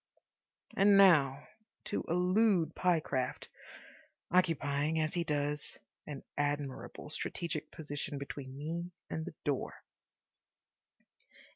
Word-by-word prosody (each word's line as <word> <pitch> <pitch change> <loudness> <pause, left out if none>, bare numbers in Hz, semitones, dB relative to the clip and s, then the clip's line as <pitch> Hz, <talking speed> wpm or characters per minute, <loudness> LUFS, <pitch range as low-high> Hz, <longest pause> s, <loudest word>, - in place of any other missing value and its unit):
And 200 0 +6
now 145 -8 +5 0.4
to - - -2
elude 180 -1 +3
Pyecraft, 155 -8 0 0.8
occupying, 160 -3 +2
as 155 0 +1
he 175 - +1
does, 150 -1 -2 0.3
an 145 -3 -6
admirable 145 0 -3
strategic 160 -1 -3
position 145 -2 -5
between 140 -1 -7
me 170 +4 -4 0.2
and 160 - -2
the - - -8
door. 140 -3 -1
155 Hz, 95 wpm, -33 LUFS, 145-175 Hz, 0.8 s, And